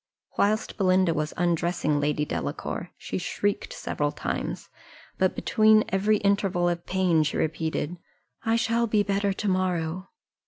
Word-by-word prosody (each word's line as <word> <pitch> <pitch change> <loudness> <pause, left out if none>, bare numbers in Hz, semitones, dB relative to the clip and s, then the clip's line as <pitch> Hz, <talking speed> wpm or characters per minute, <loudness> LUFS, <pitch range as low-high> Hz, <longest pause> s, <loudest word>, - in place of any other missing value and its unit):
Whilst 215 +2 +1
Belinda 185 -3 +3
was 150 0 -2
undressing 170 -3 +1
Lady 150 +1 0
Delacour, 160 +4 -4
she - - -4
shrieked 205 - -2
several - - -2
times; - - -4 0.5
but - - +2
between 215 -1 +4
every 205 +3 +2
interval 200 -3 +1
of 170 -1 -2
pain 180 -4 +2
she 150 - -1
repeated, 160 +1 -2 0.5
"I 225 -1 +2
shall 235 0 +1
be 210 -1 +2
better 200 0 0
to 205 +2 -3
morrow." 185 -1 -1
185 Hz, 135 wpm, -26 LUFS, 165-205 Hz, 0.5 s, between